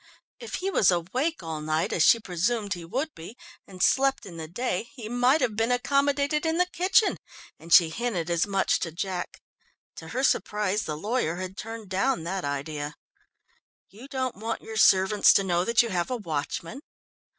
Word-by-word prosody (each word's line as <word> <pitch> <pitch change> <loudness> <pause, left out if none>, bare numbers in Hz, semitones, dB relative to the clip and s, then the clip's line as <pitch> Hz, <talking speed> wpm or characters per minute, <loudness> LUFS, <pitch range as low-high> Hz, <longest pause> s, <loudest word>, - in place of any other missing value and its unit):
If 465 - -6
he 390 +1 -2
was 210 - +4
awake 245 - -1
all 160 -2 -5
night 155 +1 -1
as - - 0
she 230 - +6
presumed 205 +2 -1
he 175 -3 -8
would 270 - -3
be, 175 +9 -11 0.3
and 185 -2 -4
slept 270 0 +2
in 175 -4 -10
the 160 -1 -6
day, 230 +4 -3
he 235 -5 -7
might 245 +6 +2
have 215 - 0
been 225 +3 +1
accommodated 280 +3 +1
in 325 0 0
the 360 - +3
kitchen, 370 +4 +2 0.4
and 165 - -13
she 165 -1 +7
hinted 200 -5 -2
as 170 +2 +1
much 195 -1 +1
to 165 - -3
Jack. 180 +1 -5 0.5
To - - -9
her 260 - -3
surprise 210 -5 0
the 150 - -4
lawyer 205 -2 -1
had 185 +1 -6
turned 225 -2 -8
down 195 +2 0
that 185 +2 -3
idea. 145 +1 -4 1.0
"You 230 +7 -12
don't 260 -5 -3
want 225 +2 -4
your 220 - -8
servants 195 -1 +5
to 195 - +3
know 175 -2 +1
that 235 +2 +4
you 235 - -4
have 175 -3 -1
a 250 - -2
watchman." 170 - -4
210 Hz, 185 wpm, -26 LUFS, 175-255 Hz, 1.0 s, she